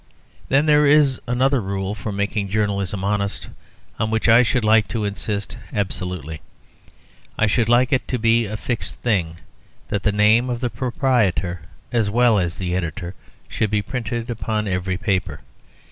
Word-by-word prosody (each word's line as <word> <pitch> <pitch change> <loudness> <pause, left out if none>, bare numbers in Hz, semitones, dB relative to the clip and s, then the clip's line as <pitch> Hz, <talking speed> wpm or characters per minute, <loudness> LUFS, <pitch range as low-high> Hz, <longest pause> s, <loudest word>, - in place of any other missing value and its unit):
Then 140 +3 +3
there 150 -1 +5
is 145 -3 +4
another 130 +2 +2
rule 95 0 -3
for 105 0 -5
making 100 0 -2
journalism 100 -2 -1
honest 100 0 -2 0.5
on 110 0 0
which 110 0 0
I 115 +1 +7
should 125 -1 +1
like 110 0 +4
to 110 -3 -2
insist 100 0 -3
absolutely. 90 -6 -4 1.0
I 110 - +3
should 115 +2 +1
like 125 +3 +4
it 130 - 0
to 125 - -1
be 115 0 +2
a 110 +1 -5
fixed 120 +1 -4
thing 90 -8 0 0.5
that 100 - -1
the 105 - +1
name 105 +4 +3
of 120 -1 -2
the 120 -1 -2
proprietor 115 - 0 0.3
as 115 -4 +1
well 115 -1 +3
as 85 -2 -2
the 90 -1 -2
editor 90 +1 -4 0.3
should 110 - -1
be 105 0 0
printed 120 +1 -4
upon 110 -2 -2
every 90 -1 -1
paper. 100 - -2
105 Hz, 160 wpm, -21 LUFS, 100-120 Hz, 1.0 s, I